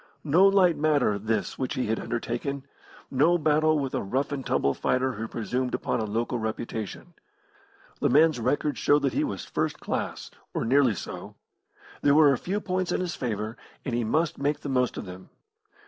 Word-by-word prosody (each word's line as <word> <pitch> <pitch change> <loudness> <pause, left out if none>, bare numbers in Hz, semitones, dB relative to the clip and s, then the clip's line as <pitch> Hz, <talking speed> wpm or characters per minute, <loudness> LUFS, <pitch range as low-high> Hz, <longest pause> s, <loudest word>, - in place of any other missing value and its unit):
No 165 +6 +5
light 190 -4 +4
matter 145 -9 +2
this 110 0 -2
which 130 - -2
he 130 - -1
had 110 +1 -1
undertaken; 120 +4 -3 0.5
no 155 +7 +4
battle 155 0 +3
with 135 -3 -2
a - - 0
rough 130 +9 -1
and 140 -2 -3
tumble 70 - +1
fighter 130 +1 0
who 110 -1 -5
presumed 125 +4 -2
upon - - -1
a 110 - -1
local 115 +3 -2
reputation. 110 - -5 0.9
The - - +2
man's 150 +1 +4
record 145 +5 0
showed 145 0 +3
that 135 - +1
he - - +1
was - - -4
first - - -2
class - - -4 0.2
or - - -1
nearly 130 -2 +4
so. - - -7 0.7
There 145 0 +4
were 150 -2 +7
a - - 0
few 195 +3 -2
points 185 -2 -2
in - - 0
his 180 -2 -2
favour, 110 -3 -3 0.3
and 130 - -2
he 120 0 +1
must 155 +8 0
make 145 +1 0
the 145 - -5
most 125 -2 +1
of - - -5
them. 90 0 -10
135 Hz, 190 wpm, -27 LUFS, 115-150 Hz, 0.9 s, were